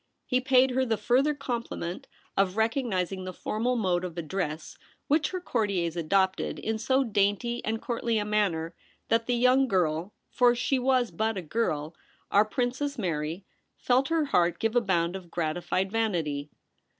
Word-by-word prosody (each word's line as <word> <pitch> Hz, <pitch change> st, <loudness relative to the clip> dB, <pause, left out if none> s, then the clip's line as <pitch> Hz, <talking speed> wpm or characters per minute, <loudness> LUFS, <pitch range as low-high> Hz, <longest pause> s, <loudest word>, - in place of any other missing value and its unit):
He 255 Hz, 0 st, +1 dB
paid 260 Hz, 0 st, +4 dB
her 260 Hz, +1 st, +1 dB
the 230 Hz, -4 st, 0 dB
further 270 Hz, +7 st, +2 dB
compliment 235 Hz, -10 st, -4 dB, 0.3 s
of 195 Hz, 0 st, +1 dB
recognising 215 Hz, -6 st, 0 dB
the 185 Hz, -, -5 dB
formal 235 Hz, +7 st, -1 dB
mode 185 Hz, -6 st, +1 dB
of 175 Hz, -2 st, -6 dB
address 160 Hz, -2 st, -3 dB, 0.3 s
which 300 Hz, +2 st, +2 dB
her 370 Hz, -, -3 dB
courtiers 200 Hz, -, -1 dB
adopted, 190 Hz, +3 st, +1 dB
in 220 Hz, 0 st, -2 dB
so 260 Hz, +4 st, +2 dB
dainty 220 Hz, +2 st, 0 dB
and 220 Hz, +1 st, -1 dB
courtly 235 Hz, -1 st, -1 dB
a 210 Hz, -, 0 dB
manner 190 Hz, -6 st, 0 dB, 0.4 s
that 230 Hz, 0 st, +2 dB
the 245 Hz, -, +2 dB
young 255 Hz, +2 st, +4 dB
girl 175 Hz, -2 st, 0 dB
— -, -, -50 dB
for 245 Hz, -1 st, +4 dB
she 260 Hz, +2 st, 0 dB
was 255 Hz, -2 st, +2 dB
but 220 Hz, -1 st, -1 dB
a 185 Hz, -, -4 dB
girl, 155 Hz, -4 st, -1 dB, 0.4 s
our 205 Hz, +2 st, +5 dB
Princess 255 Hz, +5 st, -2 dB
Mary 165 Hz, -2 st, -3 dB, 0.2 s
— -, -, -49 dB
felt 260 Hz, +2 st, +4 dB
her 325 Hz, -2 st, +1 dB
heart 175 Hz, -10 st, +2 dB
give 225 Hz, +1 st, -1 dB
a 245 Hz, -, +5 dB
bound 175 Hz, -4 st, 0 dB
of 185 Hz, -3 st, -8 dB
gratified 175 Hz, +3 st, -1 dB
vanity. 165 Hz, -10 st, -1 dB
215 Hz, 170 wpm, -28 LUFS, 175-245 Hz, 0.4 s, our